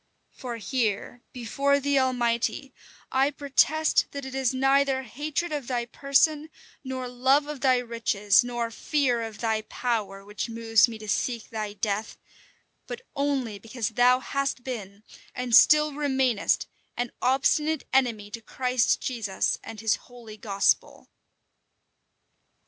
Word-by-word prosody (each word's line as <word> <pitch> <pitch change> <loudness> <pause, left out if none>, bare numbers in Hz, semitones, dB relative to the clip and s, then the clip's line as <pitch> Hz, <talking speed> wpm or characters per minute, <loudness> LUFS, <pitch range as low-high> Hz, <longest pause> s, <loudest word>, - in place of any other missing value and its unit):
For 245 -3 -7
here, 230 +1 -2
before 275 +4 0
the 280 0 +2
Almighty, 250 +1 0 0.4
I 265 +2 +3
protest 290 +2 +2
that 280 -1 -7
it 265 - -7
is 265 -2 +1
neither 270 0 +2
hatred 300 +7 -3
of 290 -5 -4
thy 245 -2 -1
person, 290 +4 +1 0.3
nor 260 -1 -4
love 260 +4 +2
of 295 -3 -7
thy 260 -2 +4
riches, 230 -3 +2
nor 240 -1 -3
fear 255 -1 0
of 225 -2 -6
thy 220 -2 0
power, 215 -4 -3
which 210 +3 -5
moves 225 -1 +3
me 230 -2 -7
to 215 0 -10
seek 230 +2 -2
thy 215 -2 -4
death; 210 +1 -3 0.7
but - - -6
only 270 -7 -1
because 225 +1 -4
thou 245 +3 +4
hast 275 -2 -2
been, 210 -5 -7 0.3
and 250 -2 +1
still 300 +2 +6
remainest, 265 -6 +1 0.3
an 245 0 -2
obstinate 300 +4 +1
enemy 230 -6 +1
to 230 - -7
Christ 250 +1 0
Jesus 225 -7 -1
and 225 -1 -9
his 220 -1 +2
holy 235 -3 -11
gospel." 200 -2 0
245 Hz, 135 wpm, -26 LUFS, 225-275 Hz, 0.7 s, still